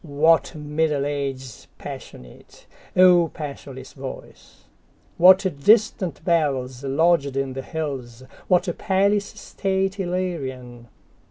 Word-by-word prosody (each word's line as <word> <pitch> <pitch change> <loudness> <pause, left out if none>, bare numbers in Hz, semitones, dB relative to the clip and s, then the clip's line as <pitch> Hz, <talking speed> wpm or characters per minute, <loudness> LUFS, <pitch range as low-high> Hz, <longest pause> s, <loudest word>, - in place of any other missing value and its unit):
What 160 +2 +2
Middle 150 -1 -1
Ages 135 -4 -5
passionate,O 175 - -1
passionless 140 -3 -8
voice! 135 -1 -11 0.6
What 185 +3 +7 0.2
distant 205 -6 +2
bellsLodged 140 -1 +1
in 135 -1 -2
the 135 - -5
hills, 130 -6 -6 0.2
what 180 +1 +2
palace 200 +1 +1
stateIllyrian! 180 - -3
150 Hz, 80 wpm, -23 LUFS, 135-180 Hz, 0.6 s, What